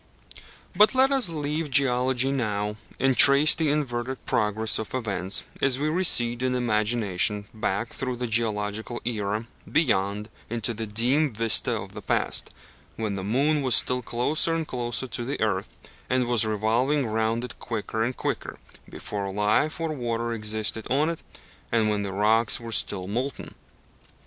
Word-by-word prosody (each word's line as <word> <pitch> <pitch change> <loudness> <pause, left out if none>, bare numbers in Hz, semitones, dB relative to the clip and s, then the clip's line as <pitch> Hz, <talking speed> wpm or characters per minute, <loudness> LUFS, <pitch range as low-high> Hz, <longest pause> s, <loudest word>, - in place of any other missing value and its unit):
But 210 +7 +5
let 265 +1 +4
us 265 -9 +3
leave 150 0 -3
geology 130 -1 +2
now, 105 -5 -2 0.2
and 135 0 +2
trace 140 +4 +8
the 160 -2 0
inverted 130 -3 -2
progress 110 0 +1
of 110 +3 -5
events 100 -6 -1 0.2
as 135 -2 +3
we 150 +2 -1
recede 125 -9 +3
in 130 0 0
imagination 105 -3 +1
back 110 +1 -2
through 130 -2 -3
the 125 +1 -3
geological 110 0 -2
era, 110 -1 -2 0.3
beyond, 105 -8 +1 0.2
into 115 0 -1
the 110 0 -5
dim 125 +8 +2
vista 115 +2 +2
of 95 +1 -9
the 105 - -8
past, 95 - -1 0.5
when 110 -3 -3
the 95 - -5
moon 140 +9 +1
was 130 -3 +3
still 125 0 +2
closer 145 +8 0
and 165 -1 -3
closer 120 +1 -3
to 120 -1 -5
the 135 +4 -4
earth, 100 -3 -2 0.3
and 130 -1 +1
was 120 -2 +2
revolving 115 +7 +1
round 110 +1 -1
it 125 - -8
quicker 110 -1 -3
and 125 +2 -3
quicker, - - -4 0.3
before 100 -1 -5
life 105 - +1
or 165 -1 -2
water 120 -3 -2
existed 110 0 -1
on 145 +5 +2
it, 165 - -6 0.5
and 110 -2 +2
when 105 -1 -1
the 100 -1 -4
rocks 110 +4 +2
were 115 -1 -8
still 95 -3 0
molten. 125 +7 -4
120 Hz, 160 wpm, -25 LUFS, 105-135 Hz, 0.5 s, trace